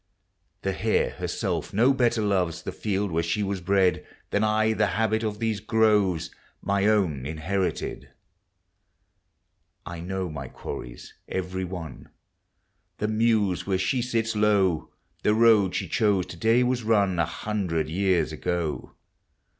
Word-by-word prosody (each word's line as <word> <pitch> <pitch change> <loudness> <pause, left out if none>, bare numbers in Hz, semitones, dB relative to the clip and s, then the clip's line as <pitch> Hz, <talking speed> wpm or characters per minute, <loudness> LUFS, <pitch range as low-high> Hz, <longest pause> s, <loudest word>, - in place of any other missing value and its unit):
The 95 - 0
hare 110 +3 +1
herself - - -3
no 125 +6 +5
better 120 -4 +1
loves 90 -4 0
The - - -4
field 100 -2 -2
where 80 +1 +1
she 85 +5 -1
was 100 -1 -2
bred. 95 -1 +2 0.3
Than 105 - +1
I 110 +1 +2
the 105 -1 +2
habit 110 0 +1
of 105 -1 -2
these 110 -2 -1
groves, 105 -5 +2 0.3
Mv 100 0 +2
own 90 -12 +1
inherited. 90 +5 -3 1.8
I 85 0 -7
know 95 +2 -3
my 70 -3 -6
quarries - - -8
every 95 0 -3
one, 90 -3 -8 0.9
The 105 - -1
meuse 110 -5 +1
where 95 -1 +1
she 95 +7 0
sits 115 -2 -1
low; 100 -6 +2 0.3
The 105 - +2
road 110 -5 +5
she - - -2
chose 100 -5 +2
to - - -7
dav 115 +7 +3
was 125 0 0
run 105 -4 +2
ft/ - - +3
A - - +2
hundred 90 -5 -2
years 95 +2 +1
ago. 85 -4 -3
100 Hz, 145 wpm, -26 LUFS, 90-110 Hz, 1.8 s, no